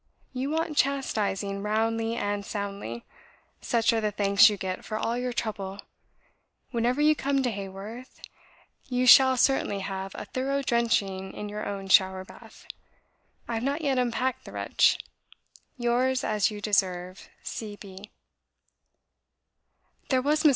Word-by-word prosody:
You 260 +2 -2
want 320 0 -1
chastising 205 -7 0
roundly 225 +2 0
and 205 -2 -2
soundly. 200 - -5 0.6
Such 230 0 +2
are 225 - +1
the 215 - +1
thanks 200 +1 +5
you 205 - -3
get 185 -1 -4
for 215 - -4
all 230 +2 -1
your 250 0 -2
trouble.... 205 -5 -4 0.9
Whenever 245 +3 0
you 305 +1 +5
come 275 -1 0
to 245 - 0
Haworth, 200 +5 -8 0.7
you 250 -1 0
shall 260 +1 +8
certainly 230 -6 +2
have 195 0 -5
a - - -6
thorough 275 +2 -2
drenching 220 -6 0
in 210 - -6
your 210 +1 -5
own 200 -1 -5
shower 190 0 +4
bath. - - -15 0.8
I 235 - -3
have 225 0 -2
not 280 +4 -1
yet 275 -4 +1
unpacked 250 +1 -1
the - - -10
wretch. - - +2 0.8
"Yours, 250 +2 +1
as 210 -2 +1
you 210 -1 -7
deserve, 185 -3 -1
C. 210 -2 -6
B." 200 0 -12
220 Hz, 135 wpm, -27 LUFS, 200-250 Hz, 0.9 s, shall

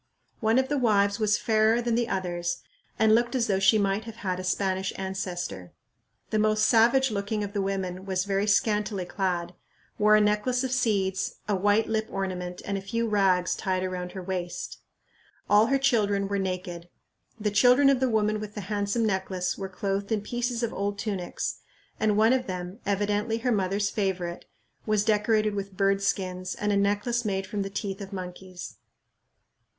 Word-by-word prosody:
One 220 +1 +2
of 260 0 +3
the 290 0 0
wives 205 -4 +2
was 210 -1 +3
fairer 220 +1 +3
than 240 -1 -1
the 235 0 +1
others 175 -2 -2 0.3
and 220 0 +4
looked 235 +3 +2
as 245 -3 +2
though 195 -3 +1
she 195 +3 +5
might 200 +1 0
have 225 -1 -8
had 185 -1 -1
a - - -4
Spanish 190 0 0
ancestor. 180 - -4 0.6
The 215 - +2
most 215 0 +3
savage 240 +3 +4
looking 205 +1 -2
of 200 0 -5
the 200 - 0
women 190 -1 -3
was 190 -1 0
very 200 +1 0
scantily 210 -2 +1
clad, 175 -2 -2 0.5
wore 210 0 +6
a - - +6
necklace 210 +5 +1
of 260 - -2
seeds, 205 -7 0
a 205 - +1
white 205 +3 +2
lip 220 0 -1
ornament, 180 -2 -4
and 200 -1 -2
a - - -9
few 230 +4 -2
rags 190 -4 +2
tied 185 -2 -1
around 180 -1 -4
her 190 -2 -6
waist. 180 -2 -4 0.7
All 210 +2 +5
her 275 - +3
children 205 -7 +2
were 200 0 -1
naked. 180 -2 -4 0.5
The 210 -1 0
children 250 +6 +5
of 275 -2 +4
the 260 -1 +2
woman 215 -1 +1
with 210 -1 -7
the 210 - -4
handsome 205 +3 -1
necklace 190 -3 -1
were 195 -1 -5
clothed 200 +2 -3
in 215 -2 +1
pieces 240 +2 -2
of 235 - -1
old 200 0 -2
tunics, 195 -4 -3 0.4
and 210 -1 +2
one 220 +3 +5
of 255 -1 0
them, 180 +2 -5
evidently 205 +2 0
her 245 +2 0
mother's 200 -1 0
favorite, 185 -4 -2 0.4
was 215 -1 +2
decorated 215 0 +2
with 200 -1 -5
bird 195 0 +2
skins 185 -2 -2
and 210 0 -1
a - - +2
necklace 205 +4 +1
made 195 -3 -1
from 200 +2 -3
the 195 - -3
teeth 195 0 -4
of 195 0 -7
monkeys. 185 -1 -8
200 Hz, 185 wpm, -27 LUFS, 190-220 Hz, 0.7 s, wore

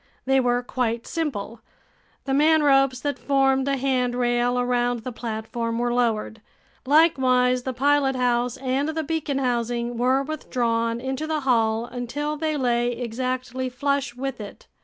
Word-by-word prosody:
They 270 0 +3
were 245 -1 +1
quite 235 -2 -2
simple. 235 -9 -4 0.6
The 270 - -3
manropes 280 -3 +4
that 285 -3 -2
formed 270 +1 +2
a 275 0 +1
handrail 245 -2 +1
around 245 -1 0
the 255 - -4
platform 230 0 -4
were 240 0 0
lowered. 225 -2 -1 0.5
Likewise 255 -5 +4
the 260 - -3
pilothouse 255 -3 +1
and 265 +3 -1
the 315 0 -2
beacon 300 -2 -2
housing 240 -2 -1
were 260 +2 +2
withdrawn 235 -6 -1
into 265 +4 -3
the 310 -1 -1
hull 230 -3 +1
until 255 +5 -4
they 310 0 -1
lay 240 -2 +1
exactly 255 +2 -3
flush 275 0 -1
with 260 -2 -4
it. 205 - -10
250 Hz, 140 wpm, -24 LUFS, 240-275 Hz, 0.6 s, manropes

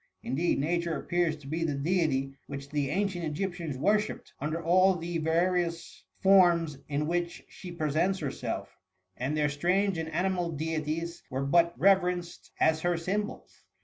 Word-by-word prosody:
Indeed, 165 +7 0
Nature 170 +3 0
appears 175 -2 0
to 145 -2 -13
be 160 +3 -2
the 150 -3 0
deity 140 -3 0
which 140 0 -7
the 145 -2 -1
an 195 +7 +1
cient 175 -3 -5
Egyptians 165 -2 -3
worshipped, 210 +8 0
under 155 +3 -2
all 185 +3 +4
the 170 0 -3
vari 170 +3 +2
ous 170 -1 -7 0.2
forms 175 -6 +5
in 145 +1 0
which 175 +1 -2
she 180 - -10
presents 170 +4 0
herself; 145 -6 -4 0.4
and 135 +5 -2
their 150 -1 +3
strange 180 +6 +1
and 160 0 -3
animal 175 +1 0
deities 160 +2 -3
were 135 +1 -2
but 170 +4 +3
re 195 - +7
verenced 180 -2 -4
as 160 0 +3
her 175 0 +1
symbols. 200 +5 -4
170 Hz, 160 wpm, -29 LUFS, 150-180 Hz, 0.4 s, re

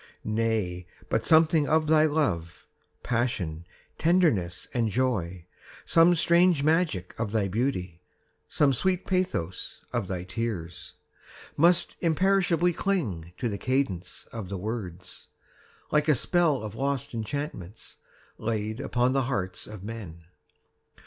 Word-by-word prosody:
20 105 - -3
Nay, 105 -6 -1 0.2
but 110 0 0
something 160 -2 +5
of 155 0 +3
thy 155 0 +5
love, 110 - -1 0.4
Passion, 95 -10 -2 0.3
tenderness, 150 - +2
and 115 -3 +1
joy, 95 -8 -1 0.4
Some 170 +1 +5
strange 170 -2 +4
magic 155 - +1
of 110 -3 -2
thy 105 -3 +1
beauty, 95 -6 -2 0.5
Some 145 -2 +3
sweet 185 +8 +1
pathos 180 - -2
of 95 - -1
thy 90 -2 -3
tears, 90 -4 -5 0.6
Must 170 +3 +3
imperishably 180 0 +2
cling 185 - 0
25 85 -1 -9
To 120 - -1
the 100 - -3
cadence 100 -9 -2
of 110 -5 -6
the 100 - -3
words, 95 -3 -6 0.6
Like 150 0 +2
a 150 - +5
spell 155 -2 +2
of 105 -2 -6
lost 140 -3 -2
enchantments 110 - -6 0.4
Laid 110 +1 -2
upon 125 -1 +1
the 135 -2 +1
hearts 95 -7 -3
of 105 -3 -9
men. 100 -7 -8
115 Hz, 130 wpm, -27 LUFS, 95-155 Hz, 0.6 s, something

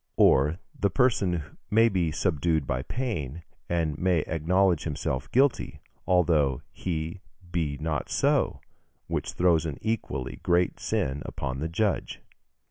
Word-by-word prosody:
Or 75 +5 +5 0.2
the 100 - +1
person 100 - +2 0.3
may 115 +2 +5
be 90 -7 +1
subdued 80 -2 +1
by 65 -1 -1
pain, 85 - -4 0.3
and 80 -3 0
may 90 -3 +2
acknowledge 85 +3 +2
himself 70 -4 -3
guilty, 135 +1 +2 0.3
although 80 -8 +3
he 85 +1 -4 0.3
be 80 -4 -1
not 75 0 -2
so, - - +1 0.4
which - - -3
throws 85 -3 +3
an 75 - -4
equally 65 - -3
great 90 0 +2
sin 65 +2 -1
upon 65 0 -4
the 80 +3 -2
judge." 100 +4 -1
80 Hz, 125 wpm, -27 LUFS, 75-95 Hz, 0.4 s, Or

